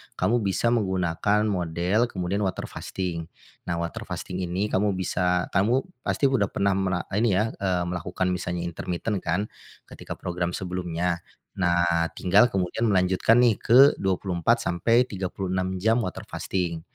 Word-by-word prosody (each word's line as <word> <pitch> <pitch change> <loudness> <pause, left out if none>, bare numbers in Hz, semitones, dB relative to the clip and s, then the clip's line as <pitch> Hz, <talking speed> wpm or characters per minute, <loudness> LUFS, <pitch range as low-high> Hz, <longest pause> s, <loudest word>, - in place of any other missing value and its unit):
kamu 120 +2 +1
bisa 105 +3 +1
menggunakan 95 -1 +1
model, 90 +2 0
kemudian 95 -2 -2
water 95 - -4
fasting. 85 -3 -4 0.4
Nah 85 - -1
water 85 0 -4
fasting 90 - -5
ini 95 +3 -2
kamu 100 0 +1
bisa, 90 -1 0
kamu, 115 +8 +2 0.2
pasti 135 +2 +1
udah 110 -7 +2
pernah 100 0 0
mera 95 -2 0
ini 105 0 +2
ya, 110 +4 +1
eee, 90 -2 0
melakukan 90 +1 -2
misalnya 90 -1 -3
intermiten 90 +4 -3
kan, 90 +3 -1 0.5
ketika - - -8
program 85 0 -3
sebelumnya? 90 -1 -2 0.4
Nah, 85 -2 +2
tinggal 100 +6 +5
kemudian 95 +3 -1
melanjutkan 95 +3 +3
nih 115 -4 +3
ke 120 - +4 0.2
24-36 95 0 0
jam 110 +5 +2
water 90 -5 -5
fasting. 85 -3 -3
95 Hz, 135 wpm, -25 LUFS, 90-105 Hz, 0.5 s, tinggal